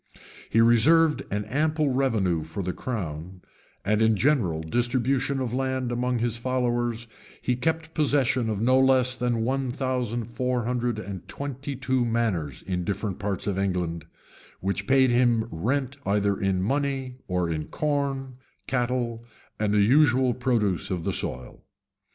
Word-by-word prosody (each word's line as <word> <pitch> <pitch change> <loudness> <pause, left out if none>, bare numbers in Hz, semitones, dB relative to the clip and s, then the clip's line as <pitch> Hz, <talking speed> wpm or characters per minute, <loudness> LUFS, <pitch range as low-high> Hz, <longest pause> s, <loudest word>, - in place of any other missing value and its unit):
He 115 - +4
reserved 150 +8 +5
an 105 +1 -2
ample 155 +1 +1
revenue 110 -11 +1
for 80 +5 -5
the 90 0 -2
crown; 90 -5 -5 0.4
and 105 +2 +2
in 110 0 +4
the - - -1
general 105 - +2
distribution 125 - 0
of 125 -3 -2
land 130 -1 -1
among 125 +1 0
his 120 0 -1
followers, 120 -1 -1 0.3
he 125 - 0
kept 160 +5 -2
possession 135 -6 +2
of 105 -2 -2
no 130 +4 +4
less 130 -1 +4
than 120 -2 -1
one 130 +1 -1
thousand 125 -3 -2
four 125 +1 -2
hundred 120 -1 -1
and 100 -3 -7
twenty 140 0 -5
two 130 0 0
manors 110 - -1
in 90 0 -2
different 100 +1 -3
parts 100 -1 -3
of 100 -2 -1
England,[] 90 -5 -2 0.5
which 100 +1 -2
paid 130 -1 +4
him 120 -2 +3
rent 130 - -1
either 100 0 +1
in 95 -1 0
money, 135 +1 -1
or 90 -2 0
in 80 -2 -2
corn, 140 -3 -2 0.3
cattle, 120 -2 -1 0.4
and 105 -1 +1
the 105 0 +4
usual 130 +1 +4
produce 115 -8 0
of 90 -3 -2
the - - -1
soil. 60 0 -4
120 Hz, 150 wpm, -26 LUFS, 100-130 Hz, 0.5 s, reserved